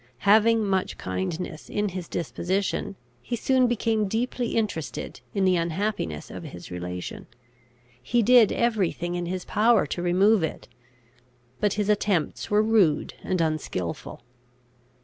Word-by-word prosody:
Having 220 Hz, +2 st, +5 dB
much 190 Hz, -2 st, -1 dB
kindness 95 Hz, -, -4 dB
in 205 Hz, 0 st, -1 dB
his 185 Hz, -2 st, -6 dB
disposition, 190 Hz, +3 st, -2 dB, 0.3 s
he 240 Hz, -, -3 dB
soon 255 Hz, +2 st, +3 dB
became 225 Hz, -3 st, +1 dB
deeply 235 Hz, +3 st, -2 dB
interested 205 Hz, -9 st, -3 dB
in 195 Hz, -1 st, +2 dB
the 185 Hz, -1 st, +4 dB
unhappiness 170 Hz, -, -2 dB
of -, -, -7 dB
his -, -, -10 dB
relation. 90 Hz, 0 st, -6 dB, 0.7 s
He 235 Hz, -, +1 dB
did 240 Hz, -1 st, +6 dB
every 220 Hz, -7 st, +1 dB
thing 175 Hz, 0 st, -4 dB
in 175 Hz, -1 st, -3 dB
his 185 Hz, 0 st, -4 dB
power 225 Hz, +2 st, +3 dB
to 175 Hz, -, -4 dB
remove 190 Hz, +4 st, +4 dB
it; 160 Hz, -, -4 dB, 0.9 s
but 205 Hz, -2 st, +2 dB
his 210 Hz, -1 st, -1 dB
attempts 205 Hz, -5 st, 0 dB
were 210 Hz, +1 st, +4 dB
rude 210 Hz, -9 st, +2 dB
and 185 Hz, -, -1 dB
unskilful. 155 Hz, -, -3 dB
195 Hz, 135 wpm, -25 LUFS, 170-220 Hz, 0.9 s, did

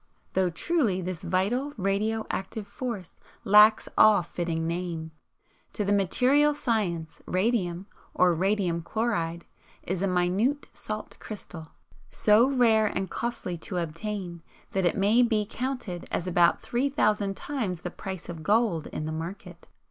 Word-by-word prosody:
Though 190 Hz, -1 st, +2 dB
truly 215 Hz, -, 0 dB
this 180 Hz, -2 st, -4 dB
vital 200 Hz, +11 st, 0 dB
radio 210 Hz, +3 st, 0 dB
active 200 Hz, +2 st, -4 dB
force 205 Hz, -, -6 dB, 0.2 s
lacks 210 Hz, +2 st, +6 dB
all 215 Hz, -4 st, +6 dB
fitting 170 Hz, -1 st, -3 dB
name. 165 Hz, -1 st, -3 dB, 0.6 s
To 210 Hz, -, -2 dB
material 260 Hz, +9 st, +3 dB
science 185 Hz, -, -2 dB
radium, 185 Hz, -3 st, 0 dB, 0.3 s
or 180 Hz, -1 st, +4 dB
radium 185 Hz, -1 st, 0 dB
chloride, 170 Hz, -4 st, -2 dB, 0.4 s
is 185 Hz, 0 st, -3 dB
a 195 Hz, -, +1 dB
minute 190 Hz, +10 st, +1 dB
salt 215 Hz, 0 st, -6 dB
crystal, 175 Hz, -6 st, -8 dB, 0.4 s
so 220 Hz, +5 st, +4 dB
rare 230 Hz, -5 st, +4 dB
and 190 Hz, -1 st, -3 dB
costly 235 Hz, -7 st, -3 dB
to 180 Hz, +3 st, -5 dB
obtain 175 Hz, +1 st, -4 dB, 0.3 s
that 190 Hz, -1 st, 0 dB
it 175 Hz, -, +1 dB
may 210 Hz, +5 st, +4 dB
be 220 Hz, -3 st, +2 dB
counted 245 Hz, -8 st, -4 dB
as 175 Hz, -, -2 dB
about 175 Hz, -1 st, +3 dB
three 255 Hz, +4 st, 0 dB
thousand 210 Hz, -7 st, +1 dB
times 210 Hz, -, -3 dB
the 180 Hz, -, -4 dB
price 190 Hz, -2 st, -7 dB
of 165 Hz, -2 st, -7 dB
gold 205 Hz, -4 st, +1 dB
in 155 Hz, -, -5 dB
the 155 Hz, -, -3 dB
market. 175 Hz, +2 st, -7 dB
195 Hz, 140 wpm, -27 LUFS, 175-220 Hz, 0.6 s, lacks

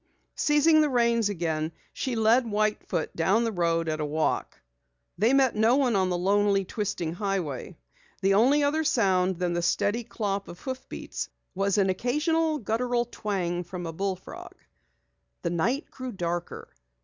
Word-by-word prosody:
Seizing 305 Hz, +1 st, +4 dB
the 300 Hz, -, +2 dB
reins 235 Hz, -4 st, +2 dB
again, 160 Hz, -4 st, -2 dB, 0.2 s
she 255 Hz, -2 st, -2 dB
led 225 Hz, +2 st, +3 dB
White 215 Hz, 0 st, 0 dB
Foot 155 Hz, -, -2 dB
down 190 Hz, +8 st, +2 dB
the 230 Hz, -, 0 dB
road 165 Hz, -3 st, 0 dB
at 155 Hz, 0 st, -1 dB
a 150 Hz, -, -1 dB
walk. 155 Hz, +1 st, -1 dB, 0.6 s
They 220 Hz, +5 st, +4 dB
met 270 Hz, -3 st, +3 dB
no 220 Hz, +3 st, +4 dB
one 260 Hz, -5 st, +2 dB
on 190 Hz, -1 st, +2 dB
the 180 Hz, -, 0 dB
lonely, 200 Hz, +1 st, +2 dB
twisting 185 Hz, -6 st, -3 dB
highway. 185 Hz, -, -3 dB, 0.5 s
The 195 Hz, +1 st, +4 dB
only 260 Hz, +9 st, +4 dB, 0.2 s
sound 190 Hz, -10 st, +2 dB
other -, -, -15 dB
than 175 Hz, -1 st, -1 dB
the 175 Hz, -, 0 dB
steady 205 Hz, +6 st, +1 dB
clop 200 Hz, -3 st, -3 dB
of 175 Hz, -, -10 dB
hoofbeats 260 Hz, -1 st, -6 dB, 0.2 s
was 195 Hz, +1 st, 0 dB
an 195 Hz, -2 st, +3 dB
occasional 305 Hz, -, 0 dB
guttural 240 Hz, +1 st, 0 dB
twang 185 Hz, -6 st, -2 dB
from 175 Hz, 0 st, -7 dB
a 165 Hz, -, -5 dB
bullfrog. 190 Hz, +1 st, -5 dB, 0.9 s
The 170 Hz, -, -1 dB
night 235 Hz, -, -1 dB
grew 255 Hz, -1 st, -6 dB
darker. 175 Hz, -3 st, -4 dB
200 Hz, 160 wpm, -27 LUFS, 175-240 Hz, 0.9 s, Seizing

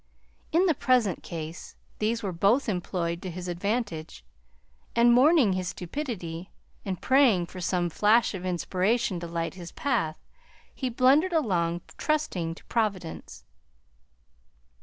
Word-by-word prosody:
In 345 Hz, +4 st, +4 dB
the 340 Hz, -, +4 dB
present 250 Hz, -, +2 dB
case 165 Hz, 0 st, -7 dB, 0.2 s
these 225 Hz, +2 st, 0 dB
were 195 Hz, -, -1 dB
both 200 Hz, +10 st, +2 dB
employed 175 Hz, -3 st, -2 dB
to 185 Hz, -, -5 dB
his 180 Hz, +1 st, -6 dB
advantage, 175 Hz, -, -3 dB, 0.7 s
and 235 Hz, +1 st, +6 dB
mourning 260 Hz, -, +5 dB
his 185 Hz, -1 st, -2 dB
stupidity 180 Hz, -, -5 dB, 0.3 s
and 190 Hz, -3 st, -4 dB
praying 255 Hz, -10 st, +4 dB
for 185 Hz, +1 st, -9 dB
some 180 Hz, 0 st, 0 dB
flash 215 Hz, +8 st, +3 dB
of 185 Hz, -2 st, -6 dB
inspiration 185 Hz, +3 st, 0 dB
to 170 Hz, -, -6 dB
light 165 Hz, 0 st, -3 dB
his 175 Hz, -3 st, -9 dB
path, 235 Hz, -, -1 dB, 0.6 s
he 260 Hz, -, -3 dB
blundered 275 Hz, +9 st, +4 dB
along, 175 Hz, -, +1 dB, 0.2 s
trusting 185 Hz, -, -1 dB
to -, -, -17 dB
Providence. 185 Hz, -, -3 dB
190 Hz, 130 wpm, -27 LUFS, 170-240 Hz, 0.7 s, and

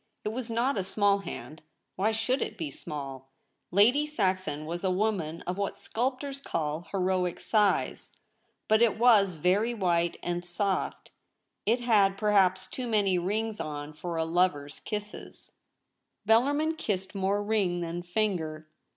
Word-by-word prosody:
It -, -, -1 dB
was 235 Hz, +2 st, -4 dB
not 235 Hz, +1 st, +1 dB
a -, -, -1 dB
small 200 Hz, +1 st, +2 dB
hand 160 Hz, -5 st, -8 dB, 0.2 s
— -, -, -52 dB
why 210 Hz, +4 st, +1 dB
should 235 Hz, +5 st, 0 dB
it 215 Hz, -, -3 dB
be 160 Hz, -5 st, -4 dB
small? 135 Hz, -2 st, -7 dB, 0.2 s
— -, -, -50 dB
Lady 260 Hz, +8 st, +5 dB
Saxon 185 Hz, -, -1 dB
was 170 Hz, +3 st, -5 dB
a 190 Hz, -, +2 dB
woman 185 Hz, -5 st, -1 dB
of 180 Hz, +2 st, -4 dB
what 200 Hz, -, -2 dB
sculptors 270 Hz, +3 st, -3 dB
call 160 Hz, -, -3 dB
heroic 185 Hz, -2 st, 0 dB
size 210 Hz, -2 st, +1 dB, 0.2 s
— -, -, -46 dB
but 220 Hz, +1 st, +4 dB
it 235 Hz, -2 st, +4 dB
was 215 Hz, -6 st, +5 dB
very 195 Hz, +9 st, +1 dB
white 175 Hz, -4 st, +1 dB
and 175 Hz, 0 st, -2 dB
soft. 190 Hz, +2 st, -2 dB, 0.6 s
It 235 Hz, +3 st, +3 dB
had 205 Hz, -5 st, +3 dB
perhaps 195 Hz, -3 st, +3 dB
too 255 Hz, -2 st, -5 dB
many 200 Hz, -5 st, +2 dB
rings 215 Hz, +4 st, -2 dB
on 150 Hz, 0 st, -5 dB
for 170 Hz, +3 st, -5 dB
a 160 Hz, -, +1 dB
lover's 165 Hz, -4 st, 0 dB
kisses; 210 Hz, -1 st, -7 dB, 0.8 s
Bellarmin 290 Hz, +8 st, +3 dB
kissed 190 Hz, -, -2 dB
more 200 Hz, +1 st, 0 dB
ring 200 Hz, -5 st, +1 dB
than 170 Hz, +1 st, -3 dB
finger. 175 Hz, -5 st, -2 dB
195 Hz, 155 wpm, -29 LUFS, 175-220 Hz, 0.8 s, Lady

